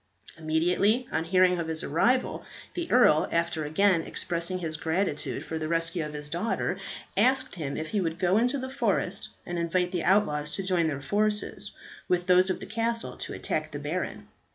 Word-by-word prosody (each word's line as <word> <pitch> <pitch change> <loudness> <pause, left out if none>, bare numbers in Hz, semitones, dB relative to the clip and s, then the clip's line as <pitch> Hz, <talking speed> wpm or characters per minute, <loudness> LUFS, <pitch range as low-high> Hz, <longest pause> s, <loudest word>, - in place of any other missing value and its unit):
Immediately 180 +9 +1
on 160 - -1
hearing 180 0 +4
of 165 - -2
his 160 -1 -2
arrival, 245 - +1 0.3
the 345 -1 -4
earl, 200 -11 +5
after 170 -2 0
again 175 +3 +3
expressing 170 +2 -2
his 165 -3 -3
gratitude 160 0 -2
for 160 - -4
the 155 - -3
rescue 165 0 -1
of 150 0 -6
his 150 0 -6
daughter, 175 +9 -1 0.4
asked 260 0 +3
him 145 -5 -4
if 155 0 -4
he 210 - 0
would 165 -2 -2
go 185 +4 +3
into 250 +4 +1
the 260 0 -5
forest 205 -7 -1 0.2
and 175 0 -3
invite 180 +1 0
the 175 -3 -1
outlaws 150 -6 +2
to 195 - -3
join 180 -3 +2
their 140 -3 -3
forces 210 +7 -1 0.4
with 180 -1 +1
those 185 +1 +5
of 185 - -1
the - - -7
castle 230 +2 -1
to - - -5
attack - - -2
the - - -5
baron. - - -4
180 Hz, 185 wpm, -28 LUFS, 160-205 Hz, 0.4 s, earl